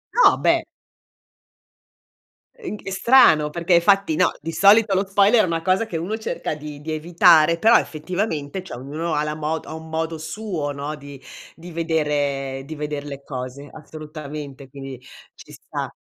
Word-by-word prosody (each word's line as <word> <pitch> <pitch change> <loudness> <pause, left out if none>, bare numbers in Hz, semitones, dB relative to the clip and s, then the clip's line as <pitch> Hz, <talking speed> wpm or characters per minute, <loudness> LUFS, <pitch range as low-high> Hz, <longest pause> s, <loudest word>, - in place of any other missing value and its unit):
No, - - +6
beh! - - +2 2.0
In 370 - -6
ch - - -18
è 195 - -5
strano, 190 - +5
perché 170 +1 +2
fatti, 195 -4 +3
no, 180 - +3
di 165 +3 -5
solito 200 +4 +5
lo 195 +1 +1
spoiler 205 +3 +4
è - - +1
una 165 -1 -1
cosa 185 +5 +1
che 165 - -4
uno 195 +7 -3
cerca 220 -7 -4
di 150 -1 -9
di 155 +1 -5
evitare, 165 0 +4
però, 225 +4 +6
effettivamente, 160 0 -3
cioè 165 -10 -9
ognuno 155 +5 -4
ha 150 - +1
la 150 0 -3
mo 155 +1 -2
ha 160 - -8
un 160 0 -9
modo 160 0 -2
suo, 160 -2 -4
no, 145 +2 -5
di 140 -2 -11 0.3
di 175 +2 -12
vedere 145 -5 -1
di 155 +2 -8
veder 150 -1 -5
le 140 -1 -8
cose, 130 +1 -7
assolutamente, 150 -3 -9
quindi 135 -2 -8 0.4
ci - - -15
sta. - - -6
160 Hz, 170 wpm, -22 LUFS, 145-180 Hz, 2.0 s, No